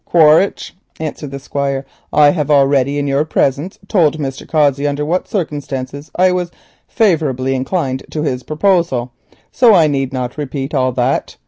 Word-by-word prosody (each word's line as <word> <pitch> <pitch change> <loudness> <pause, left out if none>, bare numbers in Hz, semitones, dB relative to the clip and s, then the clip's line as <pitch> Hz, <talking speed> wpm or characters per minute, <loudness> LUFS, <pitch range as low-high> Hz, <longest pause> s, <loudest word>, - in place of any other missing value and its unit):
"Quaritch," 160 +3 +3 0.2
answered 155 -2 -5
the 140 - -6
Squire, 140 0 -3 0.3
"I 145 -1 +5
have 150 -3 -2
already 140 -1 +3
in 145 - -1
your 140 +1 +1
presence 155 +2 -1
told 160 -8 +2
Mr. 135 -3 -5
Cossey 145 -2 +2
under 145 +1 -2
what 175 +4 -1
circumstances 145 - -4
I 185 +1 +4
was 180 -1 -1 0.4
favourably 150 - +1
inclined 130 0 -2
to 150 - -3
his 130 -4 -2
proposal, 155 -4 0 0.4
so 235 -5 +5
I 165 -3 +5
need 135 -3 -1
not 125 +1 -4
repeat 140 -1 -4
all 130 0 +1
that. 125 +2 -1
145 Hz, 155 wpm, -16 LUFS, 135-160 Hz, 0.4 s, I